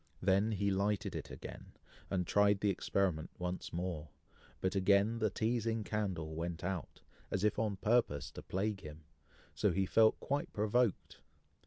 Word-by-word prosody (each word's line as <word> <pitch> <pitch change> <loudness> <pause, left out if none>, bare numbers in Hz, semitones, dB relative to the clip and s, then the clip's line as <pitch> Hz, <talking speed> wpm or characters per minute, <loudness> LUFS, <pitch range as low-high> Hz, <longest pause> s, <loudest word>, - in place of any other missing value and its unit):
Then 100 +3 +3
he 100 0 +1
lighted 100 +1 0
it - - -5
again, - - -9 0.4
and 90 -2 0
tried 100 +2 +4
the 105 - +3
experiment 90 -4 0
once 90 0 -4
more, 85 -3 -3 0.5
but 95 - 0
again 100 +3 +3
the 110 -1 +2
teazing 115 +1 0
candle 95 -8 -2
went 85 +1 -4
out, 90 -1 -4 0.3
as 95 - -1
if 105 0 +2
on 110 -3 0
purpose 95 - +1
to - - -8
plague 100 +1 -2
him, 75 +1 -10 0.5
so - - +2
he 95 0 +1
felt 110 +3 +4
quite 140 +1 -2
provoked. 110 +1 +1
100 Hz, 155 wpm, -35 LUFS, 90-105 Hz, 0.5 s, tried